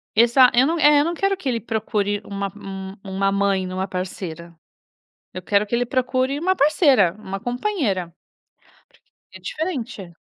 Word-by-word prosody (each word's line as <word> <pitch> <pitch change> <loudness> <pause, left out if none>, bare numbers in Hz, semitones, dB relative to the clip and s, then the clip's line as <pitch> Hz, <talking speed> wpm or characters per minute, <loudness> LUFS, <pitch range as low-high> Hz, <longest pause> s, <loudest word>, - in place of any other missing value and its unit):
Exa 240 +3 +6
eu 255 +3 +4
não 335 - 0
eh, 295 -1 +6
eu - - +4
não 340 - -2
quero 390 +2 +1
que 310 -8 -4
ele 235 -2 0
procure 210 -2 -2
uma 200 0 -4
uma 195 -1 -8
uma 195 0 -1
mãe 200 -1 +1
em 185 0 -6
uma 190 +1 -2
parceira. 175 -3 -6 0.8
Eu 185 - -6
quero 205 +2 +1
que 235 - -3
ele 245 0 +1
procure 255 +2 0
uma 370 +4 +1
parceira, 275 - +4
uma 195 -2 -6
companheira, 245 - -1 1.2
porque 190 - -14
é - - -22
diferente. 240 - -5
215 Hz, 170 wpm, -22 LUFS, 190-270 Hz, 1.2 s, Exa